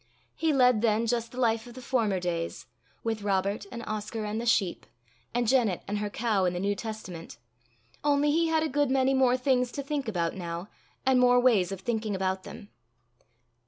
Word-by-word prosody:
He 325 -1 +1
led 250 -5 +4
then 225 0 +2
just 235 0 -1
the 255 - -7
life 230 -1 +1
of 240 - -12
the - - -8
former 230 -7 0
days, 170 -2 -3 0.4
with 225 -2 -2
Robert 200 0 -1
and 235 -1 -6
Oscar 215 +1 -4
and 210 +2 -2
the 235 - -4
sheep, 195 -6 +1 0.4
and 240 0 0
Janet 230 -7 +2
and 205 +1 -2
her 210 0 -2
cow 210 -3 0
and 180 0 0
the - - -2
New 200 +2 +1
Testament 200 -6 -7 0.7
only 290 0 +3
he 330 +2 +2
had 320 -1 +2
a - - +1
good 290 -2 +1
many 265 0 +3
more 255 -1 +4
things 250 -1 +1
to 280 - -4
think 280 -2 -3
about 170 -6 -1
now, 175 +1 -5 0.4
and 260 -1 +4
more 245 0 +5
ways 215 -8 +3
of 195 -1 -5
thinking 220 -1 -2
about 190 0 -1
them. 205 - -10
225 Hz, 195 wpm, -28 LUFS, 200-255 Hz, 0.7 s, more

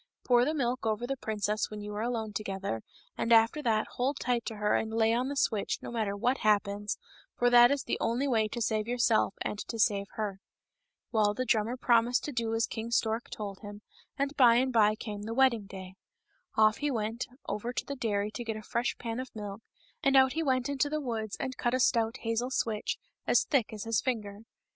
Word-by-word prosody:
Pour 245 -1 +4
the 305 - 0
milk 255 -3 -1
over 220 +2 0
the 270 +2 -2
princess 215 -3 -2
when 210 - -7
you 210 0 -6
are 210 - -3
alone 225 -2 -2
together, 195 - -3 0.3
and 230 - -2
after 230 +6 +5
that 220 -4 +1
hold 265 +3 0
tight 245 -2 0
to 225 - -4
her 210 0 +1
and 220 - 0
lay 225 0 +2
on 250 +3 0
the 285 - -3
switch, 220 -6 0
no - - -6
matter 215 -4 -1
what 250 +6 +1
happens, 205 -1 +1 0.4
for 245 0 +3
that 240 0 +8
is 280 -1 0
the - - -2
only 245 +5 0
way 225 -5 +2
to 235 +2 -3
save 215 0 0
yourself 235 -4 +2
and 205 - -3
to 230 - -5
save 200 -2 +2
her." 205 -3 -3 0.7
Well, 210 -2 +2
the 255 - -2
drummer 230 +1 +1
promised 240 0 +3
to 295 - -4
do 230 -3 -1
as 225 - +2
King 225 0 -5
Stork 230 0 0
told 200 -3 -6
him, 205 -1 -10 0.3
and 280 +1 -1
by 240 -4 +6
and 255 +1 +2
by 215 -2 +4
came 210 -2 -6
the 225 +2 -5
wedding 240 -6 +3
day. 190 -1 -9 0.6
Off 215 0 +4
he 295 - -1
went 225 -1 -2 0.2
over 220 +4 -3
to - - -3
the 280 - -5
dairy 210 -4 -1
and 235 +1 -5
got 220 - -2
a 215 - -9
fresh 235 +3 -1
pan 230 0 -4
of 260 0 -5
milk, 205 0 -6 0.4
and 275 0 +4
out 265 -1 +5
he 320 - -1
went 260 -4 +1
into 285 +1 0
the 305 +1 -1
woods 225 -6 -4
and 260 0 -4
cut 240 +1 0
a - - 0
stout 230 -1 +2
hazel 230 +2 -1
switch, 225 -5 -1 0.3
as - - +4
thick 270 -7 +1
as 215 -2 -6
his 225 -3 +1
finger. 210 -6 -3
230 Hz, 220 wpm, -30 LUFS, 210-250 Hz, 0.7 s, that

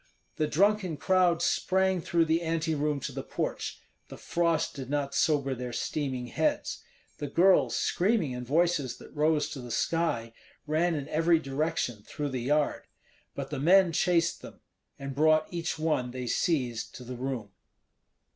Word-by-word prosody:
The 155 - +1
drunken 190 0 +2
crowd 180 +1 +2
sprang 190 -1 +1
through 165 0 +2
the 160 +1 +1
anteroom 155 -3 0
to 140 +2 -4
the 135 +1 -5
porch. - - -4 0.3
The - - -10
frost 170 -2 0
did 135 -3 -7
not 140 -1 -1
sober 140 -2 +2
their 125 -1 -5
steaming 130 -2 -2
heads. 120 - -1 0.4
The 145 - -3
girls, 180 +6 +4
screaming 190 - +1
in 125 0 -5
voices 145 -2 +1
that - - -14
rose 150 0 +2
to 135 - -7
the 120 - -9
sky, 120 -2 -1 0.3
ran 160 +3 +1
in 140 -2 -4
every 165 +2 +3
direction 135 -5 -2
through 145 +7 -4
the 130 -2 -3
yard; 145 +4 0 0.5
but - - -5
the - - -3
men 180 +4 +5
chased 170 0 +1
them, - - -12 0.4
and 140 0 -6
brought 155 +2 +4
each 170 -1 -3
one 155 -6 0
they 125 0 -5
seized 125 -3 -1
to 125 - -9
the 125 +1 -7
room. 125 -5 -4
150 Hz, 160 wpm, -29 LUFS, 130-170 Hz, 0.5 s, men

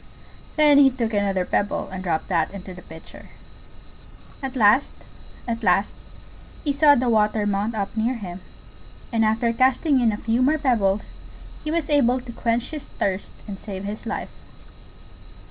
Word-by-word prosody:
Then 295 -2 +6
he 275 -1 +7
took 235 -4 -3
another 195 -3 0
pebble 205 - -1
and 190 0 -5
dropped 165 -3 -1
that 165 -4 +1
into 190 -1 -9
the 180 - -11
Pitcher. 160 -1 -13 1.1
At 270 -1 -5
last, 230 +3 +4 0.5
at 230 0 -2
last, 195 0 +2 0.7
he 290 - 0
saw 285 +1 +6
the 250 -1 0
water 215 -2 +2
mount 205 +2 -1
up 200 0 -3
near 230 +3 0
him; 185 -5 -7 0.7
and 225 -1 +2
after 225 +2 +1
casting 260 +4 +3
in 230 -2 +3
a 210 - -3
few 230 +3 0
more 295 +5 +3
pebbles 220 -9 0 0.5
he 305 - -4
was 325 -1 -1
able 260 -4 +3
to 250 -1 -9
quench 235 +2 -1
his 305 -2 -6
thirst 195 0 -3
and 195 -2 -7
save 195 -3 -7
his 210 +3 -6
life. - - -4
225 Hz, 165 wpm, -23 LUFS, 200-260 Hz, 1.1 s, he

